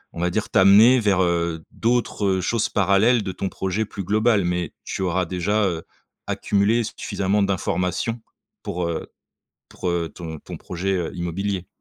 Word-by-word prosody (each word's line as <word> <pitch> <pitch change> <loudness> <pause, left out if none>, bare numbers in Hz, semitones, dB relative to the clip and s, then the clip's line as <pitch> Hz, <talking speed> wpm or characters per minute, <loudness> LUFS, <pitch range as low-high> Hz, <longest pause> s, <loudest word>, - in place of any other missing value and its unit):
on 85 - -4
va 90 - +2
dire, 105 +4 -2
t'amener 105 +6 +7
vers, 100 -4 +2
heu, 85 -2 0
d'autres 110 -5 0
choses 105 +4 0
parallèles 105 +4 +3
de 95 - -3
ton 95 +1 -3
projet 95 +3 -2
plus 100 -1 -6
global, 110 +2 +2
mais 90 -2 -1
tu - - -4
auras 90 0 0
déjà, 95 +5 0
heu, 85 -4 -1 0.5
accumulé 105 +4 +1
suffisamment 100 -1 -1
d'informations 100 +3 -1 0.4
pour, 85 -1 -3
heu 85 - -3 0.6
pour, 90 - -5
heu, 85 -1 -1
ton 80 -3 -7
ton - - -8
projet, 95 +2 -3
heu, 85 -3 -2
immobilier. 90 +2 -3
95 Hz, 160 wpm, -23 LUFS, 90-105 Hz, 0.6 s, t'amener